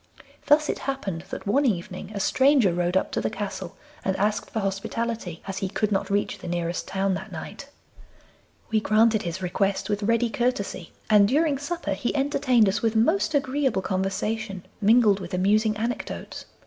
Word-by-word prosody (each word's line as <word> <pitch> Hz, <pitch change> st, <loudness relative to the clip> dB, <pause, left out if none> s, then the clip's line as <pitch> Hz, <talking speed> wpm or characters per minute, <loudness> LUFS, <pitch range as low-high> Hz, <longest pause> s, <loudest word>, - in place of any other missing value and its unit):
Thus 300 Hz, +1 st, +5 dB
it -, -, -2 dB
happened 195 Hz, -11 st, -4 dB
that -, -, -6 dB
one 265 Hz, +8 st, +2 dB
evening 185 Hz, -5 st, -2 dB
a -, -, -2 dB
stranger 260 Hz, -3 st, +4 dB
rode 175 Hz, +1 st, +1 dB
up -, -, -1 dB
to -, -, -1 dB
the -, -, 0 dB
castle 195 Hz, -3 st, -6 dB, 0.3 s
and 190 Hz, -, 0 dB
asked 210 Hz, +2 st, 0 dB
for 220 Hz, -, -2 dB
hospitality, 195 Hz, -1 st, -3 dB
as 195 Hz, 0 st, -4 dB
he 190 Hz, -, -2 dB
could 215 Hz, +2 st, -1 dB
not 195 Hz, -, 0 dB
reach 205 Hz, +1 st, -1 dB
the -, -, -8 dB
nearest 175 Hz, 0 st, -2 dB
town 195 Hz, 0 st, 0 dB
that 185 Hz, -, -5 dB
night. -, -, -8 dB, 1.0 s
We 220 Hz, -, +3 dB
granted 215 Hz, 0 st, +3 dB
his 175 Hz, +2 st, -4 dB
request 195 Hz, +3 st, 0 dB
with 205 Hz, 0 st, -1 dB
ready 230 Hz, +2 st, +1 dB
courtesy, 225 Hz, -8 st, -2 dB, 0.2 s
and 205 Hz, -2 st, +6 dB
during 290 Hz, +3 st, +2 dB
supper 340 Hz, +4 st, -3 dB
he 250 Hz, -, -2 dB
entertained 260 Hz, -5 st, +3 dB
us 195 Hz, -, 0 dB
with 225 Hz, -1 st, 0 dB
most 315 Hz, -, +2 dB
agreeable 265 Hz, -6 st, +1 dB
conversation, 195 Hz, +1 st, -2 dB, 0.2 s
mingled 215 Hz, -1 st, +5 dB
with 180 Hz, -1 st, -5 dB
amusing 215 Hz, +3 st, +2 dB
anecdotes. 235 Hz, +3 st, -4 dB
210 Hz, 175 wpm, -25 LUFS, 190-240 Hz, 1.0 s, and